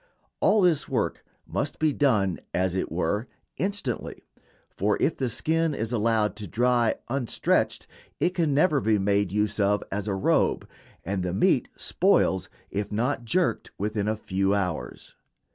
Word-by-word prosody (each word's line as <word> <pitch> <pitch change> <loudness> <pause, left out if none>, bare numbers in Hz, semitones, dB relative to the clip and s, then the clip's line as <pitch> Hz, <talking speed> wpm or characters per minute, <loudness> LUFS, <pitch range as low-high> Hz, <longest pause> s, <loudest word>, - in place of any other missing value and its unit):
All 210 +1 +4
this 175 -5 +2
work - - -1 0.2
must - - -3
be 155 -2 +2
done, 105 - +2 0.2
as 90 0 +1
it 95 - -2
were, 90 +8 -1 0.3
instantly, 190 - -3 0.4
for 105 +2 0
if 160 - +1
the 130 -2 -1
skin 160 +5 0
is 115 +2 -3
allowed 110 -3 +1
to 105 -1 -5
dry 120 +2 +2
unstretched 125 -1 0 0.3
it 175 - +2
can 170 -5 0
never 150 0 +3
be 110 -1 +2
made 100 -1 +1
use 105 +1 0
of 105 0 +2
as 100 +1 -3
a 100 - 0
robe, 95 - +1 0.4
and 95 +1 -1
the 90 -1 -2
meat - - +3
spoils 95 -1 +2 0.2
if 100 +1 -3
not 120 +3 -1
"jerked" 180 +9 0
within 105 0 -2
a 110 0 0
few 95 -1 0
hours. 90 -5 -4
110 Hz, 155 wpm, -26 LUFS, 100-135 Hz, 0.4 s, All